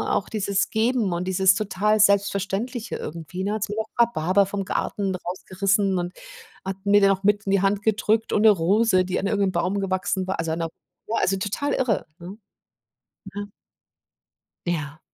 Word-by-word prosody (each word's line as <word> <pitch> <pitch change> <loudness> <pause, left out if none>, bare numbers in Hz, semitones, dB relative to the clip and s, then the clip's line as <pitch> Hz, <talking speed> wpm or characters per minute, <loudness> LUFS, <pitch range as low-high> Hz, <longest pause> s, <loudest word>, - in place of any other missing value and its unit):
auch 200 - -2
dieses 200 -2 0
Geben 225 -3 +1
und 175 +1 -2
dieses 190 +1 +4
total 210 +1 +1
Selbstverständliche 200 +4 +1
irgendwie, 170 +3 -6
ne? 200 - -1
Da - - -1
hat 215 - -2
sie 210 - -3
mir 220 - -3
noch 220 - -9 0.2
Rhabarber 190 -2 +1
vom 195 0 -3
Garten 195 0 -2
rausgerissen 190 +2 0
und 175 +1 -3 0.5
hat 190 0 -4
mir 205 +1 +5
den 195 - +5
noch 195 0 0
mit 205 +1 +2
in - - +1
die 195 -1 +3
Hand 200 +1 +1
gedrückt 220 +1 +1
und 210 - +2
'ne 220 - +8
Rose, 195 +2 +3
die 185 - -2
an - - -3
irgend 200 +1 0
'nem - - -1
Baum 185 +3 0
gewachsen 185 -1 -1
war 190 - -2
also, 165 -1 -2
an 160 - -2
'ner 165 - -1 0.4
ne, 225 - -2
also, 195 - +2
total 210 +9 -2
irre, 250 -6 0
ne? 180 +4 -9 1.0
Ja. 205 - -3 1.2
Ja. 155 -3 -3
195 Hz, 190 wpm, -24 LUFS, 185-210 Hz, 1.2 s, ne